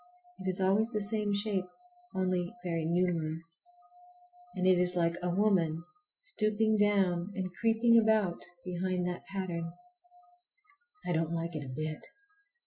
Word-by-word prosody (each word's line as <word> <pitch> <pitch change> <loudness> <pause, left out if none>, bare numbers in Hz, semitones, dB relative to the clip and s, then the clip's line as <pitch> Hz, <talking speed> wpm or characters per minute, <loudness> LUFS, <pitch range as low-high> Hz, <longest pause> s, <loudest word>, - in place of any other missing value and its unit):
It 190 - -2
is 185 - -2
always 195 +4 +3
the 215 -3 -1
same 210 0 0
shape, 200 -2 0 0.5
only 185 +1 0
very 165 -2 -1
numerous. 165 -1 -1 0.9
And 185 - 0
it 185 -1 +6
is 180 0 +1
like 170 -1 +2
a 180 - 0
woman 175 -4 +2 0.4
stooping 215 - +1
down 200 -3 +2
and 185 -2 -3
creeping 230 +1 +5
about 215 -5 +2 0.2
behind 180 0 -1
that 180 0 -5
pattern. 175 -4 -3 1.3
I 180 - -1
don't 165 0 0
like 165 0 -3
it 150 - -3
a 135 - -7
bit. 155 +4 -4
185 Hz, 135 wpm, -32 LUFS, 170-205 Hz, 1.3 s, it